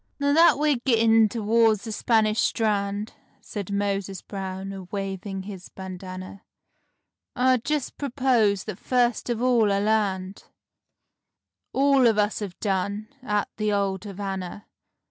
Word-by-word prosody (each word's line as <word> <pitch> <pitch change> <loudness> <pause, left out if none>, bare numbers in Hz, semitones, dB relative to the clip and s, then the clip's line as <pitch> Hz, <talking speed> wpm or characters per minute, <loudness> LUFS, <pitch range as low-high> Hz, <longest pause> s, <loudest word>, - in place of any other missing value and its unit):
"Now 285 0 +2
that 330 0 +6
we're 295 -2 +2
gittin' 225 -3 +4
t'wards 225 -1 +2
the 225 - -5
Spanish 215 0 +2
Strand," 205 -1 0 0.3
Said 200 -2 -6
Moses 200 -2 -2
Brown, 195 0 -5
a 190 -1 -8
waving 195 0 -5
his 190 -2 -9
bandana, 185 0 -8 0.9
"I 255 0 +4
just 290 +3 -3
propose 245 -7 +2
that 215 -4 -7
first 245 -2 +1
of 240 0 -1
all 235 -5 +3
I 200 - +2
land— 200 -3 0
As - - -30 1.2
all 275 -2 +4
of 220 -2 +3
us 210 0 +1
have 200 -4 -6
done—at 210 +3 -2
the 215 -1 0
old 195 -2 0
Havanna. 195 0 -5
210 Hz, 130 wpm, -25 LUFS, 195-235 Hz, 1.2 s, that